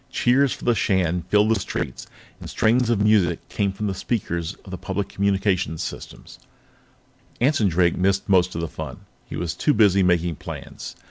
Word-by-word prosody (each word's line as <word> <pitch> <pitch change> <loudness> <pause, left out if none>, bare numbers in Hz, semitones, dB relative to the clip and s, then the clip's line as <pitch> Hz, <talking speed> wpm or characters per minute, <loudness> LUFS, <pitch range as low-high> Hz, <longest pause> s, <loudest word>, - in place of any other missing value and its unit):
Cheers 130 +2 +2
for - - -6
the 120 - +4
Shan 90 -5 0
filled 105 +1 +4
the 110 -2 +2
streets, 90 - -5 0.3
and - - -9
strains 120 +2 +2
of 115 -4 +2
music 105 -5 +2
came 100 -1 0
from 100 +2 -5
the 100 - -1
speakers 90 -4 -3
of 95 - -10
the 95 - -4
public 100 +1 -3
communications 95 -4 0
system. - - -8 1.1
Anson 125 -4 +3
Drake 85 -1 +2
missed 95 +2 +1
most 90 -3 +3
of 85 - -2
the 85 - -2
fun; - - -8 0.2
he - - -8
was 85 -1 -2
too 150 - +1
busy 100 -3 +4
making 85 -3 +1
plans. - - -8
95 Hz, 180 wpm, -23 LUFS, 90-105 Hz, 1.1 s, the